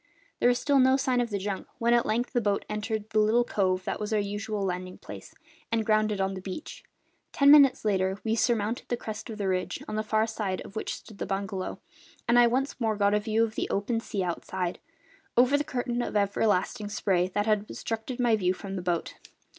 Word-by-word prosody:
There 245 - +4
was 245 - +3
still 280 +1 +2
no 260 +1 +5
sign 255 -2 +1
of 240 - -2
the 205 - -1
junk 195 0 -4
when 235 +1 +2
at 240 -1 +3
length 240 +4 -1
the 240 - +2
boat 205 -2 0
entered 215 0 -3
the 215 - +3
little 220 +3 +4
cove 185 -5 0
that - - -3
was 210 0 -4
our 215 - +2
usual 205 +1 -3
landing 185 0 -4
place, - - -11 0.4
and 225 -1 +1
grounded 215 -1 +2
on 195 0 0
the 190 - -6
beach. 295 - -7 0.5
Ten 280 0 +5
minutes 280 -6 +6
later 190 -2 +1
we 225 - 0
surmounted 230 0 0
the 240 - 0
crest 220 0 -7
of 220 - -6
the 200 -2 -2
ridge, 185 -1 -2
on 215 - -3
the - - +1
far 215 0 +1
side 210 -4 -3
of 200 - -11
which 220 - -3
stood 215 -3 -13
the - - -3
bungalow, 195 -1 -3 0.5
and 240 +1 +5
I 240 - +7
once 260 +2 -1
more 220 -2 +1
got 200 0 +2
a 210 - +3
view 220 +2 +1
of 225 -1 -1
the - - -2
open 215 +4 0
sea 210 -4 -3
outside, 180 +1 -3 0.6
over 250 +3 +5
the 290 - +2
curtain 245 -3 -2
of 225 - -1
everlasting 205 0 +1
spray 185 -3 +1
that 205 0 +1
had 215 -2 +2
obstructed 230 +3 -4
my 240 -2 +4
view 185 -3 +1
from 195 0 -6
the - - -3
boat. 175 -2 -2
215 Hz, 225 wpm, -28 LUFS, 195-235 Hz, 0.6 s, I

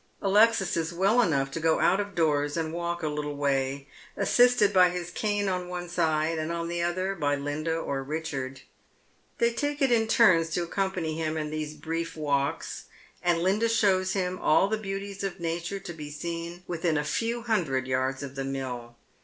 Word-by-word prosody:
Alexis 210 0 +3
is 165 0 -1
well 195 +7 +3
enough 140 - +1
to 165 - -3
go 160 0 +2
out 190 - +3
of 205 -1 -4
doors 145 -2 +1
and 160 -1 -2
walk 170 0 -3
a - - +1
little 150 -1 -3
way, 140 -1 0 0.3
assisted 245 -4 +4
by 180 -1 +6
his 175 0 -5
cane 205 +1 -1
on 180 -1 -1
one 180 -1 -5
side, 160 -1 0
and 155 +1 -2
on 170 0 -2
the 170 0 -2
other 185 +3 0
by 145 -6 0
Linda 145 +3 -2
or 140 -4 -3
Hicliard. 135 -3 -4 0.8
They 235 0 +2
take 290 +3 -2
it 270 -3 +3
in 225 -2 +3
turns 180 -8 +5
to 175 - 0
accompany 180 -2 -2
him 160 0 -1
in 150 -1 -3
these 155 -1 -4
brief 165 +2 -4
walks; 140 -2 -1 0.4
and 170 -1 +2
Linda 210 +5 +2
shows 190 -4 +2
him 185 -1 -1
all 155 - +4
the 220 - 0
beauties 195 -1 -5
of 195 -1 -3
nature 170 +3 -3
to 175 -2 -7
be 150 -2 -8
seen 170 +3 -5
within 165 -2 0
a 150 - 0
few 230 +9 -1
hundred 165 - 0
yards 130 +1 -1
of 140 -1 -6
the 135 0 -4
mill. 125 -3 -5
170 Hz, 190 wpm, -27 LUFS, 150-195 Hz, 0.8 s, by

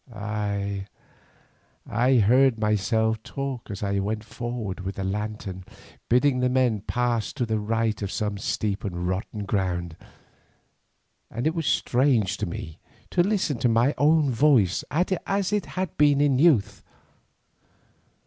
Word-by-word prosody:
Ay, 100 -2 -3 1.0
I 125 +5 +2
heard 125 +3 +4
myself 110 +1 +1
talk 135 +1 -5
as 100 -1 -5
I 100 0 0
went 105 +2 -2
forward 115 -4 -5
with 95 +1 -5
the 95 - -4
lantern, 100 -1 -4 0.5
bidding 125 +2 +3
the 125 0 +2
men 125 -5 +1
pass 120 0 -1
to 130 -4 -1
the 110 -1 -1
right 110 +1 -1
of 100 -1 -3
some 105 -2 -2
steep 100 0 -2
and 90 -4 -3
rotten 100 +3 -3
ground, 90 -4 -2 1.3
and 120 +2 -4
it 160 - +2
was 165 -3 -2
strange 120 -6 +2
to 105 - -2
me 80 -2 -7 0.3
to 175 - +3
listen 180 - 0
to 120 - +2
my 115 +5 +3
own 150 -1 +4
voice 120 - +3
as 190 +4 -1
it 210 - 0
had 185 -2 -4
been 145 -1 +4
in 140 -3 +3
youth. 110 -11 +3
110 Hz, 140 wpm, -25 LUFS, 100-135 Hz, 1.3 s, heard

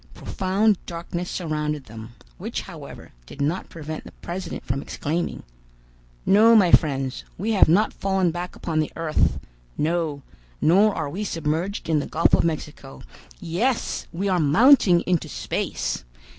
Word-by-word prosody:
Profound 195 +2 0
darkness 170 +1 -5
surrounded 150 -4 -2
them, 110 +1 -10 0.3
which, - - -4
however, - - -11 0.2
did - - -12
not 155 +6 -1
prevent 155 -1 -7
the - - -11
president 180 +2 -6
from 135 +1 -2
exclaiming: 165 +5 -3 0.8
"No, 220 +4 +6
my 190 -6 +5
friends, 135 -4 +2
we 215 +6 -1
have 200 -7 +5
not 205 +7 +3
fallen 190 -3 0
back 175 +2 -5
upon 160 -2 -2
the 155 - -1
earth; 165 -2 0 0.4
no, 155 -3 -1 0.4
nor 200 +6 +4
are - - -2
we 185 +9 -4
submerged 165 +2 -2
in 160 -2 +2
the 145 - -4
Gulf 165 - +2
of - - +5
Mexico. 150 -4 -4 0.4
Yes! 205 +8 -1
we 185 +4 -2
are 185 -2 +2
mounting 180 - +5
into 180 -3 -1
space. - - -3
170 Hz, 145 wpm, -24 LUFS, 150-190 Hz, 0.8 s, No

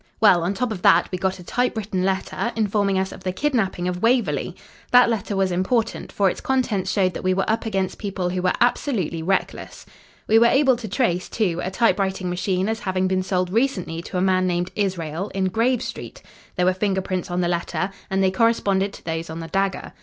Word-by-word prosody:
Well, 190 -5 +6
on 180 +4 -1
top 245 +3 -1
of 190 -5 -5
that, 170 0 +5
we 185 - -3
got 190 0 -1
a 180 - -11
typewritten 215 -4 -1
letter, 195 +5 -1
informing 205 -3 +1
us 190 0 -1
of - - -11
the 185 - -1
kidnapping 195 -6 -1
of 180 0 -3
Waverley. 215 - +1 0.3
That 245 -1 +6
letter 205 -2 -2
was 190 -1 +1
important, 220 +6 -1
for 200 - +2
its - - -2
contents 250 -8 0
showed 185 -3 +1
that - - -6
we 185 0 +2
were 195 - 0
up 225 +1 0
against 195 -3 -2
people 195 -3 -2
who 180 0 -2
were 180 0 +1
absolutely 230 - 0
reckless. 190 +4 -2 0.4
We 220 +1 +5
were 235 - +6
able 270 0 +4
to 230 -2 -7
trace, 185 -5 0
too, 180 -6 -1
a - - -2
typewriting 190 -3 0
machine 185 +1 -1
as 220 0 -1
having 185 -1 -1
been 185 0 +1
sold 185 -1 -1
recently 195 -8 0
to 180 - -5
a - - +1
man 185 -1 +2
named 175 0 -1
Israel, 185 -2 -2
in 190 -1 +1
Grave 240 +5 +1
Street, - - -8 0.3
There 180 - +1
were 185 - +3
finger 190 0 0
prints 185 -2 -3
on 175 +1 -1
the 175 - +1
letter, 175 +2 -2 0.2
and 195 0 +1
they 190 - +3
corresponded 200 -2 +1
to - - -13
those 165 0 -3
on 160 +1 -6
the 165 0 -7
dagger. 195 +2 -1
190 Hz, 215 wpm, -22 LUFS, 180-220 Hz, 0.4 s, Well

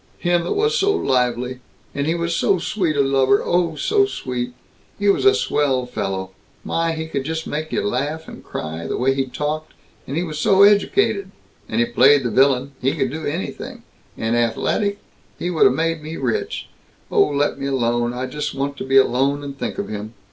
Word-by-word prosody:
Him 175 -1 +1
that - - -1
was 440 +2 +1
so 405 -3 +3
lively! 125 - 0 0.3
And 140 +1 -2
he 165 - +1
was 170 0 -1
so 190 - +2
sweet 175 -2 -1
a 145 - +3
lover, 135 -1 +3
oh, 175 -2 +1
so 405 - +2
sweet. 125 - -4 0.4
He 205 0 +1
was 200 - +2
a 400 +1 +7
swell 140 - +1
fellow; 95 -6 -3 0.3
my, 165 0 0
he 160 0 -4
could 140 -4 -3
just 160 +2 -3
make 155 +1 -4
you - - 0
laugh 145 +9 -2
and - - -11
cry, 80 +1 -5
the - - -2
way 135 +2 +2
he 135 -1 -1
talked; 150 +4 -4 0.3
and 140 - -3
he 170 - +1
was 155 -3 -5
so 195 +5 +5
educated, 205 - +3 0.4
and 110 - -1
he 120 - +4
played 135 +4 +5
the 120 - -1
vi'lin 135 +1 +3
he 135 +4 +1
could 135 -5 -1
do 160 +2 -4
anything 165 +6 -5 0.3
and 110 +1 0
athaletic 200 - 0 0.4
he 175 - -2
would 165 - +4
have 130 - +5
made 165 0 0
me 155 +2 -6
rich. 125 -4 -2 0.4
Oh, - - +4
let 145 -1 0
me 140 - -2
alone. 120 -3 0
I 125 +1 -3
just 150 +2 -4
want 140 +1 -2
to - - -4
be 135 +1 +3
alone 135 +2 +3
and 140 -1 -6
think - - -4
of 200 - -3
him. 105 +2 -6
140 Hz, 205 wpm, -21 LUFS, 125-165 Hz, 0.4 s, a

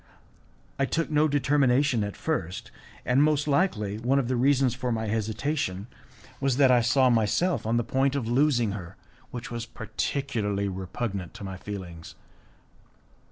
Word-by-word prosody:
I 140 - +3
took 165 +3 -1
no 150 +1 +4
determination 140 -3 +2
at 100 -1 -5
first, 90 +3 -3 0.3
and 125 +3 +3
most 150 -1 +2
likely 110 - +1
one 125 +4 +1
of 130 -3 0
the 130 - +1
reasons 130 0 +3
for 125 0 -3
my 110 -1 -1
hesitation 110 -1 -2 0.5
was 135 -2 +1
that 135 -2 +5
I 125 -1 +5
saw 125 +2 +3
myself 115 - +1
on 115 +1 +2
the 120 - +1
point 135 +3 +1
of 130 -5 -2
losing 120 -3 +2
her, 95 -2 -7 0.3
which 120 -1 -7
was 120 0 -4
particularly 110 -4 -2
repugnant 95 0 -4
to - - -9
my 95 -1 -5
feelings. 90 -4 -8
120 Hz, 155 wpm, -27 LUFS, 105-140 Hz, 0.5 s, that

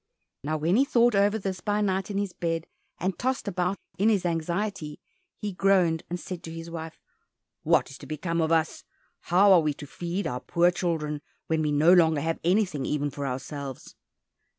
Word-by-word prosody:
Now 155 +2 -1
when 165 +6 +2
he 265 - +5
thought 240 -3 +3
over 205 +2 +3
this 190 -3 -4
by 210 0 0
night 195 -2 0
in 200 - -3
his 200 -3 -2
bed, 165 -1 -2 0.3
and 185 0 -2
tossed 255 -3 -1
about 180 0 -1 0.2
in 210 +3 +4
his 200 -5 +1
anxiety, 170 -1 -2 0.4
he 205 -2 -4
groaned 180 -4 +3
and 175 +1 -3
said 180 -1 -6
to 160 - -7
his 165 0 -7
wife, 160 -1 -7 0.6
"What - - +2
is 140 - -11
to 140 - -11
become 165 +3 -2
of 160 0 0
us? 160 -1 +1 0.4
How 190 +3 +5
are 175 - +6
we 150 -2 0
to 145 - -9
feed 175 +6 -4
our 125 -2 -2
poor 175 0 +3
children, 155 -4 -2 0.2
when 160 -1 0
we 150 -1 0
no 155 +4 +5
longer 160 -4 +4
have 165 +2 -1
anything 180 -5 +1
even 145 +1 -1
for 140 0 -4
ourselves?" 135 +1 -6
170 Hz, 195 wpm, -27 LUFS, 155-195 Hz, 0.6 s, are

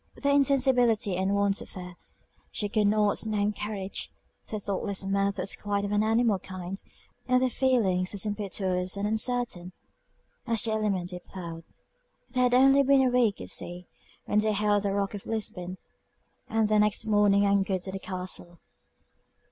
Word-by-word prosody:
Their 280 0 +1
insensibility 250 -7 +3
and 190 +2 0
want 200 0 +1
of - - -10
fear, 180 -1 -9 0.6
she 210 - -1
could 210 0 +2
not 210 0 +2
name 210 -1 0
courage; 205 -2 -4 0.4
their 215 - -4
thoughtless 200 0 -2
mirth 200 0 0
was - - -1
quite 205 -1 -2
of 200 - -4
an 210 0 +2
animal 220 -2 +2
kind, 185 +1 -7 0.4
and 255 0 +4
their 255 0 +1
feelings 205 -9 +1
as 200 - -1
impetuous 195 -3 -2
and 200 +1 -1
uncertain 220 -5 0 0.7
as 230 -2 +2
the 225 - 0
element 200 -5 -1
they 180 - -6
plowed. 170 -3 -9 0.7
They 255 0 0
had 250 0 +3
only 270 +2 +6
been 275 0 +4
a 255 - +2
week 240 -5 +2
at - - -7
sea 175 0 -4 0.4
when 210 - +2
they 215 0 +1
hailed 205 0 +2
the 200 -1 -1
rock 200 0 -1
of 205 - -8
Lisbon, 185 -5 -3 0.7
and 220 -1 +1
the 215 0 +3
next 210 -1 +1
morning 205 -2 +4
anchored 195 -2 +1
at 190 - -5
the 195 - -4
castle. 180 -2 -5
205 Hz, 170 wpm, -28 LUFS, 190-220 Hz, 0.7 s, only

